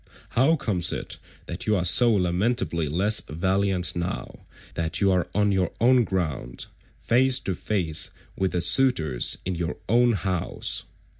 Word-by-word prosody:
How 135 +7 +2
comes 100 - -1
it - - -3 0.3
that - - -7
you 105 - +2
are 90 -3 -1
so 120 +7 +6
lamentably 90 -2 0
less 100 +8 +2
valiant 95 +2 0
now 85 +2 -6 0.3
that 80 -1 -3
you 100 -2 +2
are 90 -2 0
on 105 0 +2
your 95 -3 0
own 125 0 +4
ground, 80 -10 -4 0.3
face 130 +2 +2
to 95 - -3
face 90 -5 -1 0.3
with 95 -1 -2
the 90 - 0
suitors 85 - +3
in 95 - -2
your 85 -1 -4
own 120 +2 +3
house? 95 -3 -1
95 Hz, 150 wpm, -24 LUFS, 85-115 Hz, 0.3 s, so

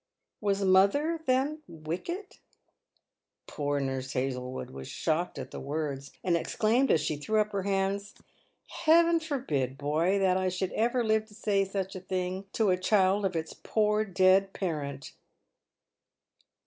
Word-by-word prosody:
" - - -58
Was 200 -1 0
mother, 200 - +3
then, 270 +4 +1
wicked 175 - -6 0.5
?" - - -50
Poor 145 -1 -2
Nurse 135 -1 -3
Hazlewood 125 0 -3
was 65 0 -8
shocked 160 +1 -1
at 130 -1 -6
the - - -6
words, 140 -2 -4
and 175 -2 +2
exclaimed, 230 +9 +1
as 155 - +4
she 150 0 -1
threw 215 +9 0
up 210 0 +1
her 200 - -1
hands, 195 +1 -1 0.3
" - - -44 0.2
Heaven 335 +1 +6
forbid, 155 - -2
boy, 155 +7 +1
that 190 -2 +3
I 185 0 +1
should 185 +1 -2
ever 240 +2 +1
live 220 -1 +1
to 210 - -16
say 205 -3 +1
such 195 0 -4
a - - -4
thing 185 +1 -3
to 215 -4 +2
a 180 - +2
child 195 +1 +2
of 185 -2 -1
its 160 -1 -3
poor 210 0 +1
dead 190 0 +3
parent 145 -7 -4
190 Hz, 160 wpm, -29 LUFS, 155-215 Hz, 0.5 s, Heaven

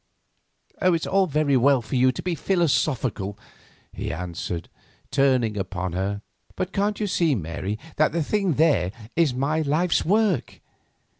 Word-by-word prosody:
"It 185 - +4
is 165 - -2
all 195 -1 +2
very 150 -2 +1
well 130 0 +4
for 110 - -5
you 130 +1 +4
to - - -7
be 180 - -1
philosophical," 135 - 0 0.6
he - - -4
answered, 85 0 -5 0.4
turning 130 -5 +2
upon 95 -3 -3
her; 100 +3 -2 0.3
"but 185 +1 -3
can't 205 +1 0
you 215 - 0
see, 170 -6 +2
Mary, 95 +3 -4 0.2
that 155 - +3
the 165 -1 0
thing 195 +1 0
there 125 - +3 0.2
is 160 -6 +2
my 145 +5 0
life's 160 +4 +1
work? 200 - +1
140 Hz, 150 wpm, -24 LUFS, 105-170 Hz, 0.6 s, It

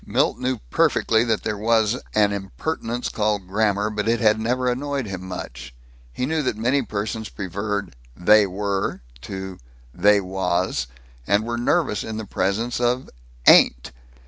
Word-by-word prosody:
Milt - - +1
knew 130 0 -1
perfectly 115 0 +3
that 110 -3 0
there 105 -2 -2
was 110 0 +2 0.2
an 105 -1 +4
impertinence 115 +5 -3
called 105 -3 -1
grammar, 105 +1 +1
but 105 0 -2
it 115 0 +2
had 110 -1 +3
never 125 +3 0
annoyed 135 +1 -1
him 95 -3 -6
much. 70 -9 -8 0.4
He 125 - -2
knew 160 +3 0
that 130 -6 -1
many 125 +5 +2
persons 110 -1 -4
preferred 100 -1 -4 0.2
"They 105 +3 +5
were" 100 -2 -2 0.2
to 95 +2 -7 0.3
"They 105 0 +4
was," 90 -7 -1 0.4
and 100 +2 +3
were 120 0 -2
nervous 135 -2 +1
in 110 -1 -5
the 110 - -5
presence 105 +6 -1
of 125 +1 0 0.3
"ain't." - - +6
105 Hz, 150 wpm, -23 LUFS, 95-120 Hz, 0.4 s, ain't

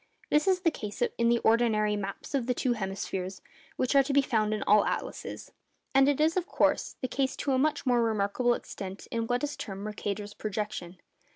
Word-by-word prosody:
This 300 +5 +3
is 370 -1 +3
the 335 -3 +3
case 210 -3 -4 0.2
in 235 0 +4
the 235 - +4
ordinary 220 -2 +3
'maps 200 +5 -5
of 260 -4 0
the 250 - +1
two 250 0 +1
hemispheres' 190 -2 -4 0.4
which 255 - 0
are 275 - +8
to 275 +1 -2
be 280 0 +5
found 215 -5 +1
in 215 - -1
all 210 0 +5
atlases. - - -4 0.4
And 270 +1 +6
it 285 - +1
is, 315 +2 +3
of 365 -2 0
course, - - +1
the 255 - -1
case 265 0 -1
to 280 - -2
a 260 - +3
much 295 +1 +1
more 245 -2 +3
remarkable 225 +2 +1
extent 195 -3 -8
in 230 -1 -1
what 245 +3 0
is 295 0 -2
termed 195 0 -6
Mercator's 205 0 -4
projection. 205 -4 -4
230 Hz, 205 wpm, -29 LUFS, 205-270 Hz, 0.4 s, are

